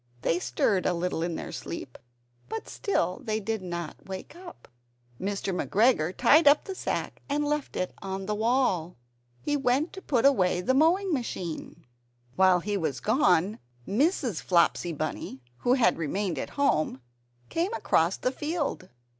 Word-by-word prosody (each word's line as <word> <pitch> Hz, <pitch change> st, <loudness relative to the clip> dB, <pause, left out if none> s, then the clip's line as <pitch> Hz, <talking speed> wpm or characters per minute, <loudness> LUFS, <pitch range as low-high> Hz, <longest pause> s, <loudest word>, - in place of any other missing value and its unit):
They 170 Hz, -, +2 dB
stirred 185 Hz, +1 st, +1 dB
a 180 Hz, -, +1 dB
little 170 Hz, -1 st, -2 dB
in 170 Hz, 0 st, -1 dB
their -, -, -6 dB
sleep, 140 Hz, -6 st, -7 dB, 0.5 s
but 445 Hz, 0 st, -5 dB
still 185 Hz, -, -1 dB
they 215 Hz, -3 st, -1 dB
did 220 Hz, 0 st, -3 dB
not 175 Hz, -2 st, -6 dB
wake 190 Hz, -, -7 dB
up. 350 Hz, -1 st, -12 dB, 0.5 s
Mr. 195 Hz, 0 st, -2 dB
McGregor 195 Hz, -4 st, +2 dB
tied 310 Hz, +1 st, +5 dB
up 285 Hz, +1 st, +6 dB
the 385 Hz, -, -5 dB
sack -, -, -3 dB
and 295 Hz, +1 st, 0 dB
left 295 Hz, -1 st, -2 dB
it 185 Hz, -, -2 dB
on 195 Hz, 0 st, -4 dB
the 210 Hz, -, -1 dB
wall. 215 Hz, -7 st, +1 dB, 0.5 s
He 295 Hz, -, 0 dB
went 275 Hz, +3 st, +1 dB
to 385 Hz, -, -8 dB
put 265 Hz, -8 st, +1 dB
away 185 Hz, -10 st, +4 dB
the 185 Hz, +8 st, +1 dB
mowing 340 Hz, +6 st, +3 dB
machine. 175 Hz, -, -4 dB, 0.5 s
While 185 Hz, -2 st, +5 dB
he 205 Hz, +2 st, -1 dB
was 145 Hz, -8 st, -2 dB
gone, 185 Hz, -, +2 dB, 0.3 s
Mrs. 250 Hz, -, +1 dB
Flopsy 175 Hz, -1 st, +2 dB
Bunny 150 Hz, -4 st, -5 dB
(who 245 Hz, -, +2 dB
had 240 Hz, -9 st, +3 dB
remained 170 Hz, 0 st, -1 dB
at -, -, -4 dB
home) 155 Hz, -, +1 dB, 0.5 s
came 345 Hz, +5 st, 0 dB
across -, -, +2 dB
the 255 Hz, -, -1 dB
field. 295 Hz, -, -3 dB
205 Hz, 155 wpm, -28 LUFS, 180-280 Hz, 0.5 s, up